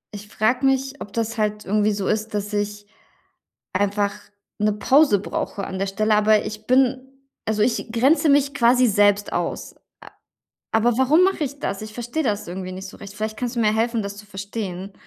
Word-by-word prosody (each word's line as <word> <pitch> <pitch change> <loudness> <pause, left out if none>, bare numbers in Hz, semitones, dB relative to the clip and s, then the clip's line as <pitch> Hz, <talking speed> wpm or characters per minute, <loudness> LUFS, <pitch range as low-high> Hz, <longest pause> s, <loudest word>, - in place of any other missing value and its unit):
ich 205 +1 -9
frage 245 +6 0
mich, 270 +1 0
ob 205 - -7
das 230 +1 -2
halt 210 0 -1
irgendwie 210 +2 +2
so 200 -2 -2
ist, 215 0 -1
dass 205 +1 -3
ich 205 0 -2 0.9
einfach 200 +1 +1 0.5
'ne 210 0 +1
Pause 260 +1 +4
brauche 200 0 -4
an 190 - -5
der 195 - -1
Stelle. 215 +2 +1
Aber 215 0 +4
ich 215 0 -7
bin 260 0 +3 0.4
also, 215 -1 0
ich 225 0 0
grenze 275 +8 +3
mich 280 0 +3
quasi 250 0 +4
selbst 205 -1 +3
aus. - - -3
Äh. - - -35 1.0
Aber 225 +1 +2
warum 290 +7 +4
mache 380 -5 +1
ich 280 +1 -5
das? 195 +1 -3
Ich 215 0 -9
verstehe 240 +7 -3
das 210 -5 -1
irgendwie 185 +1 -6
nicht 190 +1 -7
so - - -12
recht. 200 -1 -10
Vielleicht 215 +1 -4
kannst 245 0 -3
du 235 - -1
mir 215 -1 +3
helfen, 230 +1 0
das 200 0 -6
zu 210 - -11
verstehen. 195 -1 -6
215 Hz, 195 wpm, -22 LUFS, 205-245 Hz, 1.0 s, Pause